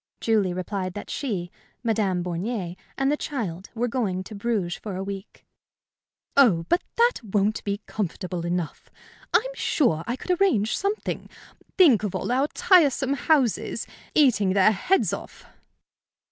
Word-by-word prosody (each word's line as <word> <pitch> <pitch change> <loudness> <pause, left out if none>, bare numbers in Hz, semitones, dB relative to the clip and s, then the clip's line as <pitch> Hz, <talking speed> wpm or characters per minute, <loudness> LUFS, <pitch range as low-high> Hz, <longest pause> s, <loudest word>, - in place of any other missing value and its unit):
Julie 215 -5 +2
replied 185 0 -3
that 205 - -7
she, 190 -10 -3 0.3
Madame 200 -6 +1
Bornier, 180 +1 -3 0.2
and 270 +1 +2
the - - +3
child 205 - -4
were 240 +2 0
going 210 -7 -1
to 215 - -10
Bruges 200 -4 -1
for 205 -4 -6
a 190 - -3
week. 195 +1 -8 0.9
"Oh, 200 -12 +5
but 350 - +3
that 475 - +2
won't 205 0 0
be 200 +1 -2
comfortable 185 -3 -4
enough! 175 -1 -3 0.4
I'm - - +2
sure 170 - +1
I 240 - -1
could 360 +7 -2
arrange 220 - +3
something. 400 +2 -3 0.5
Think 310 - +6
of 210 -4 -3
all - - -2
our 265 +3 +2
tiresome 285 -7 +3
houses 275 -4 +1 0.3
eating 210 -10 +4
their 200 +2 +5
heads 360 - +1
off!" - - -8
215 Hz, 145 wpm, -25 LUFS, 185-270 Hz, 0.9 s, Think